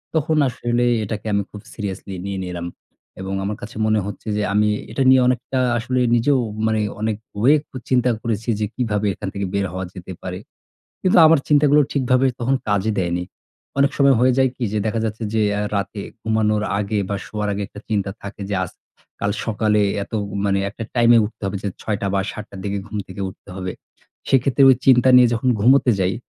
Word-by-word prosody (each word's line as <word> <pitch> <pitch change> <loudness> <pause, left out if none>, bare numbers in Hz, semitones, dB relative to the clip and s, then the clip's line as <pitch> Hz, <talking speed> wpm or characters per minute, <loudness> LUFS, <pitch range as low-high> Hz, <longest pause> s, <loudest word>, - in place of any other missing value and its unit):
তখন 155 0 +1
আসলে 120 0 -1 0.2
এটাকে 105 +1 -5
আমি 100 - +2
খুব 105 - -9
সিরিয়াসলি 100 -2 -5
নিয়ে 100 -1 -3
নিলাম। 85 -1 -5 0.5
এবং 95 0 -4
আমার 100 +1 -3
কাছে 105 - -9
মনে 110 0 +3
হচ্ছে 105 +2 -8
যে 105 - 0
আমি 105 +1 +3 0.2
এটা 135 - 0
নিয়ে 130 0 +6
অনেকটা 125 +1 0 0.2
আসলে 125 +2 -1 0.2
নিজেও 130 +3 +3 0.3
মানে 110 0 +1 0.2
অনেক 110 -1 -1 0.2
ওয়েক 145 +5 +5
ও - - -5
চিন্তা 125 -1 +3
করেছি 115 0 -3
যে 105 - +1
কিভাবে 105 -4 -1
এখান 100 +1 -7
থেকে 100 -1 -3
বের 100 0 0
হওয়া 95 0 -3
যেতে 90 0 -9
পারে। - - -5 0.6
কিন্তু 185 -1 +4
আমার 160 0 +6
চিন্তাগুলো 150 0 +5
ঠিকভাবে 130 -1 +2
তখন 125 +3 +1
কাজে 100 +1 +1
দেয়নি। 90 0 -1 0.5
অনেক 140 +1 +4
সময় 140 -1 +5
হয়ে 130 +1 +4
যায় 130 -1 +4
কি 125 - -8
যে 110 - 0
দেখা 110 +1 -1
যাচ্ছে 110 +1 -4
যে 110 - +2 0.2
আ - - 0 0.2
রাতে 100 +1 -3 0.2
ঘুমানোর 110 -1 +1 0.2
আগে 105 +1 -1
বা 100 - -1
শোয়ার 105 -1 -3
আগে 100 +1 -3
একটা 105 - -12
চিন্তা 100 -3 0
থাকে 100 +1 -8
যে, 100 - -2
আজ, 90 - -4 0.5
কাল 100 - 0
সকালে 105 -1 +1 0.2
এত 100 - -10 0.3
মানে 100 -1 +2
একটা 115 +2 -7
টাইমে 120 -1 +6
উঠতে 110 +1 -8
হবে 95 +1 -2
যে 100 - -1
৬ 105 - -1
টা - - 0
বা 100 - +2
৭ 105 - -7
টার 100 - -10
দিকে 100 0 -2
ঘুম 110 - -7
থেকে 95 +1 -8
উঠতে 95 - -14
হবে। 95 -1 -4 0.6
সেক্ষেত্রে 135 +1 +3
ওই 130 - +5
চিন্তা 130 -1 +6
নিয়ে 125 -1 +8
যখন 120 +3 -1
ঘুমোতে 130 +3 +5
যাই। 95 0 +1
110 Hz, 200 wpm, -21 LUFS, 100-125 Hz, 0.6 s, নিয়ে